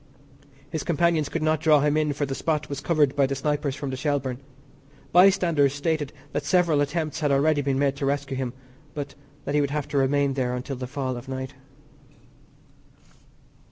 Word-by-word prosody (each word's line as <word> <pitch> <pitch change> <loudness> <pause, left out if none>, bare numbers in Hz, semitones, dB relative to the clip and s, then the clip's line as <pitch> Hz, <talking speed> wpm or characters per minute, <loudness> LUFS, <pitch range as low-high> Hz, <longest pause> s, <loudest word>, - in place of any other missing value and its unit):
His 160 - -2
companions 170 -2 +1
could 165 - -2
not 155 0 +2
draw 155 -2 +4
him 150 +1 +2
in 155 -1 +1
for 145 +1 -1
the 135 - -4
spot 150 +2 -1
was 140 -1 -4
covered 150 -4 +2
by 140 -2 +3
the 135 - -2
snipers 145 0 -1
from 140 -2 -4
the - - -3
Shelbourne. 135 -2 -1 0.7
Bystanders 175 -6 +4
stated 145 -1 -1 0.2
that 145 - -2
several 160 0 +3
attempts 155 +1 -2
had 150 -3 +1
already 145 +2 +3
been 135 -1 0
made 140 0 +1
to 140 - -1
rescue 140 -1 -1
him, 130 -2 -3 0.4
but 145 -1 -5 0.3
that 140 - -2
he 150 - +3
would 140 - 0
have 145 0 -2
to 145 - +1
remain 140 +1 +2
there 125 -2 -1
until 125 +2 -4
the 125 0 -5
fall 130 -1 -3
of 120 +2 -9
night. 130 0 -5
145 Hz, 190 wpm, -25 LUFS, 135-155 Hz, 0.7 s, draw